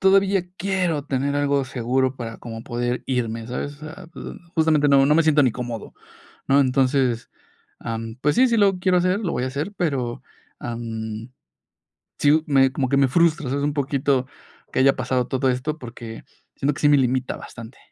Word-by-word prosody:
todavía 195 0 +4
quiero 180 -6 -1
tener 140 0 -1
algo 140 -1 +1
seguro 130 +1 -1
para 115 -2 -6
como 115 -1 -8
poder 120 0 -2
irme, 115 -3 -2
¿sabes? 135 +4 -4
O - - -22
sea, 155 +2 -9
pues, - - -9 0.3
justamente 155 -3 +3
no 140 -1 +5
no 150 - +4
me 165 - +5
siento 155 -2 +4
ni 125 -4 +3
cómodo, 120 -2 -6 0.5
¿no? 140 +1 +5
Entonces, 130 -2 +1 0.5
am, 115 -1 -5
pues 150 - +2
sí, 260 +1 +5
sí 235 - +1
lo 200 -3 +4
quiero 180 0 +3
hacer, 185 +3 +1
lo 190 -6 -2
voy 125 - -1
a - - -1
hacer, 145 +9 -4
pero, 135 -10 -2 0.4
am, 115 0 -5 0.9
sí 155 +2 +4
me 135 -2 +4
como 130 -1 -1
que 140 - +2
me 140 -1 +4
frustra, 160 0 +2
o - - -2
sea, 140 +2 -1
es - - -2
un 145 0 0
poquito 140 -2 0 0.5
que - - +1
haya 135 +1 +5
pasado 125 -1 -1
todo 130 0 0
esto 130 +5 -2
porque 115 -3 -9 0.3
siento 145 +2 0
que - - -8
sí 145 - +5
me 145 - +6
limita 130 -1 0
bastante. 115 +1 -11
135 Hz, 195 wpm, -23 LUFS, 125-150 Hz, 0.9 s, me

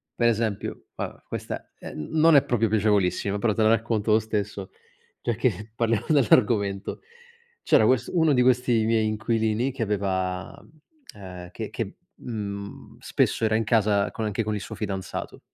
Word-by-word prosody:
Per 120 - +2
esempio, 110 -3 -1
va - - -3
beh - - -20
questa - - -6
è - - -9
n 75 - -6
non 160 0 +6
è 140 - +7
proprio 115 -2 +1
piacevolissima, 100 -2 +1
però 105 0 +1
te 110 - -1
la 110 - +5
racconto 115 -1 +1
lo 110 - +5
stesso, 105 -3 -4 0.5
giacché 110 -3 -1
parliamo 115 -1 0
dell'argomento. 105 -8 +2 0.6
C'era 110 - +4
quest 125 +1 +2
uno 160 -4 +3
di 125 - +3
questi 125 -3 +3
miei 110 -1 +2
inquilini 110 +3 0
che 130 -2 -7
aveva, 95 -3 -2
mhmm, 155 - -22 0.4
ehm, 90 -2 -9
che - - -6
che, - - -5 0.2
mhmm, 100 -3 -7
spesso - - 0
era 110 - +2
in 110 0 +1
casa 105 -3 +2
con 110 - -5
anche 105 +1 -1
con 105 0 -2
il 105 - -4
suo - - -7
fidanzato. 95 -3 -5
110 Hz, 170 wpm, -25 LUFS, 100-115 Hz, 0.6 s, è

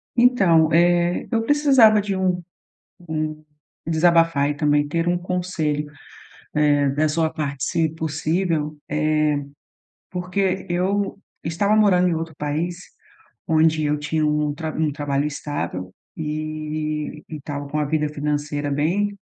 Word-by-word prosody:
Então, 190 -11 +4
eh, 175 +1 +3
eu 225 -2 +1
precisava 265 -6 +5
de 200 -1 -2
um 185 -1 0 0.7
um 155 -1 -3 0.4
desabafar 165 -3 +3
e - - -2
também 145 0 +2
ter 165 +3 -1 0.2
conselho, 160 -5 -2 0.8
eh, 145 -1 +3
da 150 +3 +1
sua 160 +1 +1
parte 140 -4 -4
se 165 -1 +1
possível, 160 0 -1
eh, - - -2 1.1
porque 185 +1 -1
eu 195 +3 0 0.2
estava 200 +6 +1
morando 190 -4 +4
em 175 - +1
outro 165 0 -4
país 155 +4 -2 0.7
onde 160 0 +3
eu 150 0 +1
tinha 155 +1 0
um 150 -1 +1
traba 155 +1 -5
um 155 -2 +1
trabalho 145 -1 -1
estável 145 -11 -4 0.2
e 155 0 -4
e 160 - -6
estava 145 0 -6
com 145 +2 -3
a 150 - +1
vida 150 +1 0
financeira 145 0 -2
bem 190 +8 0
155 Hz, 130 wpm, -22 LUFS, 150-180 Hz, 1.1 s, precisava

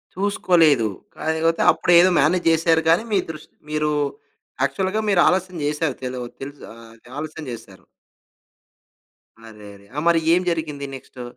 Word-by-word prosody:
చూసుకోలేదు. 170 - +3 0.3
కాకపోతే 160 +1 0
అప్పుడేదో 175 +1 +4
మేనేజ్ 165 +5 +2
జేశారు 165 0 +3
కానీ, 170 +7 +4
మీ 200 - +3
ద్రుష్ 155 -1 -9 0.2
మీరు 150 0 0 0.7
యాక్చువల్‌గా 190 +10 -1
మీరు 190 -4 +4
ఆలస్యం 185 -1 0
చేశారు 150 -1 -1
తెలు 125 0 -4 0.2
తెలుసు 140 +1 -9
ఆహ్, 115 0 -14
అది 115 +1 -20
ఆలస్యం 155 +1 -6
జేశారు. 110 -5 -11 1.6
అరేరే! 105 -2 -13
ఆ! 150 - -1
మరి 170 -1 +4
ఏం 180 - +3
జరిగింది 155 -4 -3
నెక్స్టు? 130 -1 -11
155 Hz, 130 wpm, -21 LUFS, 135-170 Hz, 1.6 s, అప్పుడేదో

